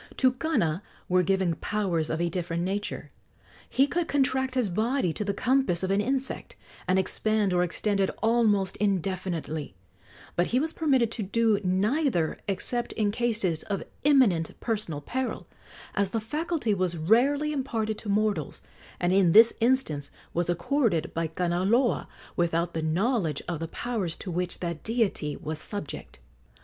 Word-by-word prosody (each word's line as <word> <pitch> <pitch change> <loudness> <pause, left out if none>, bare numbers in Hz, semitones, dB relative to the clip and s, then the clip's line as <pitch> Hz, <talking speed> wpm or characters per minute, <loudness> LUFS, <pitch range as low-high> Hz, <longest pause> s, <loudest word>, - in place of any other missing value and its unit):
To 260 -1 +4
Kana 250 - 0 0.3
were 185 0 +3
given 190 -1 +1
powers 185 -7 -1
of 160 - -1
a 175 - +1
different 170 -1 -2
nature. 200 +3 -3 0.6
He 270 - +4
could 340 +3 -1
contract 265 -2 +1
his 240 -7 +1
body 220 - +1
to 210 - -3
the 205 - 0
compass 245 -4 +1
of 190 - 0
an 200 +1 +3
insect, 265 +3 -3 0.3
and 185 - +3
expand 205 +1 +1
or 180 - +3
extend 195 +3 0
it 195 - +2
almost 215 -4 +2
indefinitely; 180 - -2 0.6
but 175 - +2
he 250 - +1
was 315 +3 -1
permitted 265 -8 +2
to 230 - -3
do 215 +1 +2
neither 195 - +1
except 240 +5 -1
in 210 -2 +1
cases 210 -8 0
of 200 -2 -3 0.2
imminent 245 - +3
personal 205 -10 -2
peril, 260 - -3 0.5
as 200 -1 +1
the 225 - -1
faculty 295 +1 -1
was 185 -3 -1
rarely 270 - +3
imparted 225 -6 -2
to 210 - -6
mortals, 200 -7 0 0.4
and 175 +1 +1
in 185 -4 +4
this 225 +2 +8
instance 225 - +1 0.2
was 175 0 0
accorded 175 - +1
by 165 0 -1
Kanaloa 180 - +1 0.3
without 170 -1 0
the 160 - -2
knowledge 170 - 0
of 175 -3 -3
the 165 - -3
powers 200 -4 -2
to 185 - -6
which 180 +1 -2
that 170 -3 -3
deity 220 -10 0
was 155 0 -5
subject. 205 +5 -7
200 Hz, 155 wpm, -27 LUFS, 175-240 Hz, 0.6 s, this